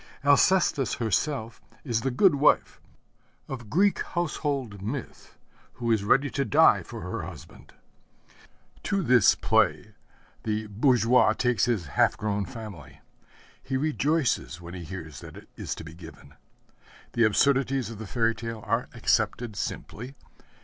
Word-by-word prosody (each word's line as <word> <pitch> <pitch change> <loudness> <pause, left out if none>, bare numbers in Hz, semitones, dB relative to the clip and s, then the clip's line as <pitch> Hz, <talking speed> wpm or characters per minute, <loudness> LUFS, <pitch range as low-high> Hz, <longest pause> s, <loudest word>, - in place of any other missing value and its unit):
Alcestis 145 - +3
herself 115 - -2 0.2
is 115 -5 -1
the 135 - 0
good 165 +8 +4
wife 145 +1 +2 0.7
of 120 -5 -7
Greek 195 - +2
household 140 - -3
myth, 120 +6 -7 0.4
who 120 -2 -2
is 110 -3 +2
ready 135 +7 +3
to 140 - 0
die 110 - +5
for - - -9
her - - -4
husband. - - -11 1.1
To 195 -2 -1
this 125 - +5
play - - +1 0.5
the 110 0 -2
bourgeois 120 +3 +3
takes 120 -6 +1
his 115 -8 -1
half 70 - +1
grown 105 -2 -2
family. 95 - -10 0.6
He 135 - -2
rejoices 150 - 0
when 85 0 -10
he 90 -2 -7
hears 80 -7 -8
that - - -11
it - - -14
is - - -5
to - - -9
be 80 0 -10
given. 85 -1 -13 0.8
The 120 - +2
absurdities 135 +3 +2
of 110 - -9
the 110 - -7
fairy 115 +1 +1
tale 115 -1 -7
are 115 +3 -1
accepted 110 0 0
simply. 125 +6 -6
115 Hz, 140 wpm, -26 LUFS, 105-135 Hz, 1.1 s, die